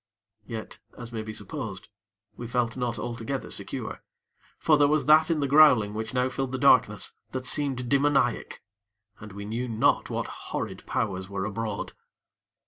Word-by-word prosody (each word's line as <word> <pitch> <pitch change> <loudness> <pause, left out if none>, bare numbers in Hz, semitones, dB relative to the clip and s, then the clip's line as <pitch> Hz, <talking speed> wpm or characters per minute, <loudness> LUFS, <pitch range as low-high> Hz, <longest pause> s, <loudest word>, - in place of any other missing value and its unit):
Yet, 110 -2 -7 0.2
as 120 -1 -8
may 110 - -3
be 110 0 -6
supposed, 110 -5 -6 0.5
we 120 - -7
felt 120 -1 0
not 120 -2 -2
altogether 120 +3 -4
secure; - - -4 0.6
for 155 - +4
there 145 -1 +5
was 150 +1 +2
that 155 +2 +6
in 160 -3 +1
the 140 - +1
growling 130 -8 +6
which 110 +1 -4
now 125 0 +1
filled 130 0 -3
the - - 0
darkness, 125 -6 +3 0.2
that 130 -1 -3
seemed 130 -2 0
demoniac, 140 -2 +1 0.6
and 105 -1 -10
we 100 +1 -7
knew 115 +4 -3
not 115 -2 +2
what - - -2 0.2
horrid - - -4
Powers 95 -3 -2
were 95 -1 -3
abroad. 110 0 -4
120 Hz, 160 wpm, -27 LUFS, 110-135 Hz, 0.6 s, that